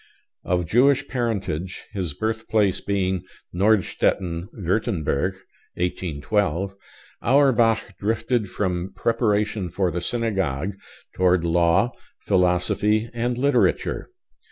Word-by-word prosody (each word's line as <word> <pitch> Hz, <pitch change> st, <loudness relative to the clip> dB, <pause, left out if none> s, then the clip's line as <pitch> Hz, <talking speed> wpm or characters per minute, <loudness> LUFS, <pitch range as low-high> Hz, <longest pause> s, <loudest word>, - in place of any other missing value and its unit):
Of 90 Hz, -1 st, 0 dB
Jewish 125 Hz, -, +3 dB
parentage, 100 Hz, -, -2 dB
his 90 Hz, -8 st, -3 dB
birthplace 110 Hz, 0 st, 0 dB
being 95 Hz, -2 st, -1 dB, 0.3 s
Nordstetten, 90 Hz, -3 st, +1 dB
Würtemberg 95 Hz, -, -1 dB, 0.4 s
(1812), 90 Hz, +2 st, -1 dB, 0.5 s
Auerbach 120 Hz, -4 st, +3 dB
drifted 110 Hz, 0 st, 0 dB
from 90 Hz, -1 st, -2 dB
preparation 105 Hz, -3 st, 0 dB
for 90 Hz, +1 st, 0 dB
the 90 Hz, +1 st, -3 dB
synagogue 95 Hz, -, -1 dB, 0.4 s
toward 90 Hz, -2 st, +3 dB
law, 85 Hz, +7 st, +3 dB, 0.3 s
philosophy, 100 Hz, +4 st, +2 dB
and 120 Hz, +1 st, -1 dB
literature. 140 Hz, +3 st, +1 dB
100 Hz, 85 wpm, -23 LUFS, 90-115 Hz, 0.5 s, Jewish